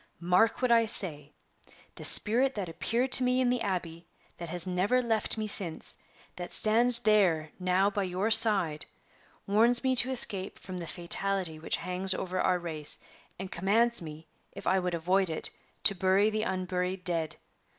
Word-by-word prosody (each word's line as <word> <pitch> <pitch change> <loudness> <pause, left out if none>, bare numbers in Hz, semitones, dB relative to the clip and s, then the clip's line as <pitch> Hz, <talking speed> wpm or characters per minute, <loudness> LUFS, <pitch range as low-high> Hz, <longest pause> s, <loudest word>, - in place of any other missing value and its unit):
Mark 180 +8 0
what 250 - 0
I 230 -1 +2
say! 150 -8 -3 0.6
The - - -12
spirit 255 +5 +6
that 200 -4 -5
appeared 235 +10 -3
to 255 - +5
me 250 0 0
in 255 -1 0
the 250 -1 -3
Abbey 175 -5 -6 0.3
that 170 -1 -9
has 175 +1 -3
never 185 +7 -1
left 225 -3 -2
me 215 - -4
since 190 -6 -1 0.4
that 175 -1 -8
stands 235 +3 +6
there 185 -9 0
now 185 +2 0
by 205 - -4
your 190 +3 -3
side, 195 -10 +4 0.6
warns 230 +4 +1
me 260 -1 0
to 245 - +6
escape 205 -7 -1
from 185 -1 -10
the 170 - -8
fatality 180 -1 -2
which 160 - -2
hangs 185 +1 -1
over 185 0 -5
our 180 - 0
race, 160 -4 0 0.4
and 190 0 -9
commands 225 +6 0
me, 160 0 -11 0.3
if - - -12
I 190 +1 0
would 180 -1 -4
avoid 185 +3 -1
it, 160 - -1 0.3
to - - +3
bury 190 +3 0
the 215 0 -3
unburied 185 -1 -4
dead. 165 -4 -3
190 Hz, 170 wpm, -27 LUFS, 175-220 Hz, 0.6 s, spirit